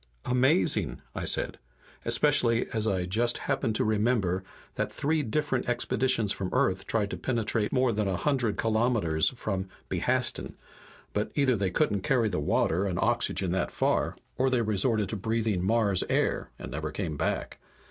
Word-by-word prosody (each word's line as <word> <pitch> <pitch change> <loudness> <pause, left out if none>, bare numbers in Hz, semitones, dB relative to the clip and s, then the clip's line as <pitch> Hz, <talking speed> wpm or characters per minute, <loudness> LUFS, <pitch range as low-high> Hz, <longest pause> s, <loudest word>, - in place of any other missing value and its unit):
"Amazing!" 125 - +2
I - - -4
said. - - -2 0.5
"Especially 115 0 +2
as 110 -1 -1
I 95 -4 0
just 115 +6 +1
happen 135 -4 -1
to - - +1
remember 105 -4 +1 0.3
that - - -2
three 155 +2 0
different 135 0 -1
expeditions 120 -2 +1
from 95 -1 -3
Earth 95 0 +1
tried 105 -2 0
to - - -4
penetrate 115 -3 0
more 130 -2 +2
than 105 -2 -1
a 95 -2 0
hundred 125 -7 0
kilometers 110 -8 +2
from 95 -5 -3 0.2
Behastin, - - 0 0.6
but 105 - -1
either 140 -4 +3
they 100 -3 0
couldn't 100 -1 +1
carry 120 0 +2
the 90 - -2
water 85 +5 +1
and 90 -2 -2
oxygen 115 -5 +1
that 90 -1 0
far, - - 0 0.2
or 130 +1 +3
they 125 -2 +1
resorted 105 0 +1
to - - -3
breathing 110 -2 -1
Mars 105 -2 +3
air, - - 0
and - - -8
never 75 +3 -3
came 80 -1 -4
back. - - -2
110 Hz, 160 wpm, -28 LUFS, 95-120 Hz, 0.6 s, either